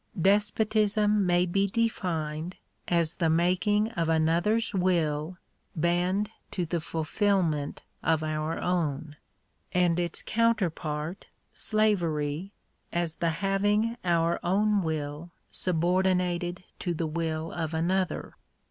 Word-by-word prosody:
Despotism 210 +1 +2
may 175 0 +3
be 195 +3 +1
defined 175 -7 -1 0.3
as 170 -2 +1
the 165 -2 +2
making 185 +6 +2
of 165 -6 -1
another's 170 +9 +2
will 170 -3 0 0.4
bend 180 +5 +1 0.2
to 180 - -2
the 170 0 -2
fulfilment 160 -2 0 0.2
of 160 -1 +1
our 155 +1 -2
own: 155 -4 -1 0.6
and 175 -1 +3
its 175 -2 -2
counterpart 175 -8 0 0.2
— - - -45
slavery 175 -6 0 0.2
— - - -45
as 170 -1 -2
the 170 - +1
having 205 +6 +1
our 170 -1 +2
own 205 +3 +2
will 155 0 -3 0.2
subordinated 180 0 +1 0.2
to 175 -2 -2
the 165 - -1
will 160 0 -2
of 160 -2 -3
another. 180 +3 -1
175 Hz, 110 wpm, -28 LUFS, 160-195 Hz, 0.6 s, may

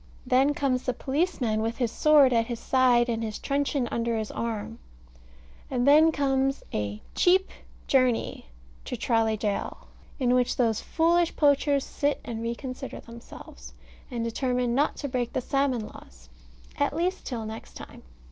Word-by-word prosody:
Then 265 +3 +3
comes 260 -3 0
the 255 - -2
policeman, 265 -7 -1
with 225 +1 -2
his 240 -4 -1
sword 290 -3 +5
at 230 -1 +2
his 235 -2 -4
side 250 -2 +3
and 230 -1 -2
his 215 -1 -4
truncheon 280 -2 -1
under 230 0 -1
his 220 -1 -4
arm: 225 0 -4 0.9
and 250 0 0
then 310 +3 +7
comes 270 -2 0
a 105 0 -3
"cheap 370 +2 +3 0.3
journey" 255 -3 +1 0.4
to - - -4
Tralee 225 -2 +1
Gaol, 205 -1 -3 0.3
in 250 -3 +2
which 250 -1 +2
those 225 -3 +1
foolish 340 +1 +1
poachers 285 -1 +3
sit 290 0 -1
and 225 -1 -5
reconsider 255 +3 -5
themselves, 235 0 -12 0.3
and 240 -3 -3
determine 245 +1 -1
not 285 +4 +1
to 285 - -4
break 250 -3 -2
the - - 0
salmon 265 -4 0
laws 60 - -14 0.5
at 285 0 +1
least 360 +3 -1
till 230 -4 -4
next 220 +1 -9
time. - - -11
250 Hz, 155 wpm, -26 LUFS, 230-280 Hz, 0.9 s, then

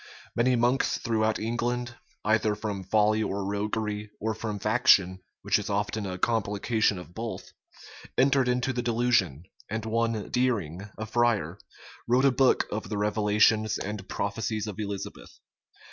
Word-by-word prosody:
Many 125 +2 +3
monks 120 +3 +2
throughout 110 -1 0
England, 120 +2 -2 0.3
either 110 0 +2
from 105 -3 -4
folly 110 +2 +2
or 100 -2 -2
roguery, 105 +1 -2
or 110 +1 -1
from 110 -1 -4
faction, 100 -3 +4 0.2
which - - +2
is - - -5
often 105 0 -1
a 90 -1 -4
complication 110 0 +1
of 90 -1 -10
both, 115 +3 -6 0.7
entered 135 -1 +4
into 125 +1 0
the 125 - -1
delusion; 115 - +1 0.3
and 110 +1 -3
one 115 -1 -1
Deering, 105 -7 -1
a 110 - -4
friar, 120 -1 +1 0.5
wrote 125 +3 +3
a 135 - +6
book 130 +1 +3
of 105 -2 -4
the 105 - -2
revelations 105 +1 +2
and 105 -1 -6
prophecies 105 +1 -2
of 105 -1 -7
Elizabeth. 100 -2 -6
110 Hz, 145 wpm, -27 LUFS, 105-120 Hz, 0.7 s, a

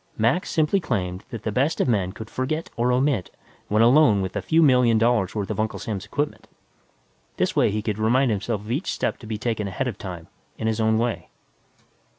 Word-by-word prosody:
Mac 120 +11 +1
simply 160 +5 +2
claimed 90 - -3
that 115 -3 -7
the 110 - -2
best 135 +8 0
of - - +2
men 100 -6 +1
could 110 +2 -9
forget 145 +8 -3
or 120 +1 +1
omit 125 -5 +1 0.4
when 110 +2 +3
alone 120 -5 +5
with 95 - -5
a - - -1
few 165 +1 +3
million 125 -5 +4
dollars' 115 -4 +2
worth 100 -2 -2
of - - -4
Uncle's 110 0 -3
equipment. 115 +8 -3 0.9
This - - 0
way - - +4
he 105 +1 -2
could 105 -1 -2
remind 120 +4 +3
himself 105 +1 -2
of 105 +2 -7
each 145 +10 -1
step - - -2
to 115 - -11
be 110 -1 -3
taken 110 -2 -2
ahead 130 +7 -2
of 110 -5 -5
time, 90 -4 -7 0.3
in - - -4
his 110 0 0
own 110 0 +3
way. 115 0 -2
115 Hz, 205 wpm, -24 LUFS, 105-130 Hz, 0.9 s, alone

